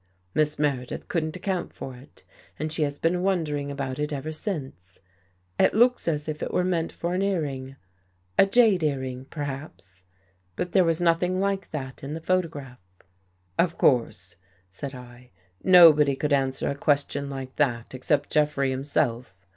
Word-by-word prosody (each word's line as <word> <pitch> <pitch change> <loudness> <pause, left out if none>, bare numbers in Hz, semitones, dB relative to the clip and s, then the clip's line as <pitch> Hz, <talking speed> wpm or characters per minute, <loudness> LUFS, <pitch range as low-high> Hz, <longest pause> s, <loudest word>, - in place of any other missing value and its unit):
Miss 150 -1 +1
Meredith 135 -4 -2
couldn't 155 -2 -2
account 190 -3 -3
for 130 - -7
it 130 +4 -17 0.3
and 155 0 -3
she 160 - -2
has 145 -1 0
been 175 +3 +1
wondering 155 -7 -1
about 135 -2 -4
it 150 0 -2
ever 145 +2 -4
since. 135 - -6 0.6
It - - +4
looks 245 0 +3
as 150 -2 -1
if 155 -1 -4
it - - -3
were 180 - +1
meant 170 -3 0
for 170 +1 -3
an 185 - 0
earring 140 -9 -2 0.3
— 90 0 -17
a - - +7
jade 215 -3 +4
earring, 130 -4 -2
perhaps. 135 - -7 0.5
But 175 - -3
there 190 - +5
was 165 +1 +1
nothing 175 +2 +2
like 195 0 -1
that 135 -4 -6
in 145 +3 -4
the - - -5
photograph." 160 - -2 0.4
" 90 0 -27
Of 170 -1 -3
course," 110 -8 +1 0.3
said 135 +9 -7
I, 125 0 -13 0.2
" 90 +1 -40
nobody 160 -6 +7
could 145 +2 -1
answer 135 -1 0
a 140 - 0
ques 140 0 +2
tion 140 0 -4
like 135 -1 -7
that 120 -6 0
except 140 +3 0
Jeffrey 150 -3 +2
himself. 125 -5 -1
145 Hz, 170 wpm, -26 LUFS, 130-165 Hz, 0.6 s, a